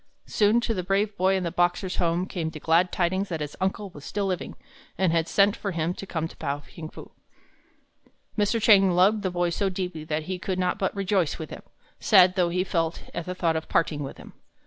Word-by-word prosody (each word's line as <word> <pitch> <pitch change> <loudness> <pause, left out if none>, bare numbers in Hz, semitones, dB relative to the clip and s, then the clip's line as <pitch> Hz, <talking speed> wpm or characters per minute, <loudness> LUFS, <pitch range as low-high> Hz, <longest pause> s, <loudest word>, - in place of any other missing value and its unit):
Soon 215 +2 +3
to 235 - -1
the 185 - -2
brave 200 +3 0
boy 190 +1 +2
in 190 - -1
the 170 - -2
Boxer's 175 +1 0
home 170 +1 +1
came 170 -4 -3
the 160 -1 -9
glad 170 +4 +3
tidings 190 +2 0
that 165 -3 -3
his 150 -1 -5
uncle 190 +1 -2
was 145 -4 -12
still 200 +5 -2
living, 185 -2 -3 0.4
and 190 -3 +2
had 165 0 +1
sent 200 +3 +3
for 200 -3 -4
him 165 +1 -1
to 195 - -8
come 160 -3 -2
to - - -15
Pao 140 +1 -2
ting 155 +2 -10
fu. - - -12 1.2
Mr. 210 +2 +1
Chang 205 -3 +6
loved 200 +5 +4
the 190 - -1
boy 175 -1 0
so 195 +3 0
deeply 180 -4 -4
that 155 0 -2
he 185 +3 -4
could 185 0 -3
not 180 -1 0
but 190 - -1
rejoice 195 -4 0
with 160 - -7
him, - - -8 0.4
sad 185 -4 +6
though 180 -2 +2
he 180 +1 0
felt 165 -3 -1
at 170 - -5
the 180 - -3
thought 165 -3 +1
of 160 0 -4
parting 155 -3 +1
with 135 - -6
him. - - -13
180 Hz, 230 wpm, -26 LUFS, 165-195 Hz, 1.2 s, Chang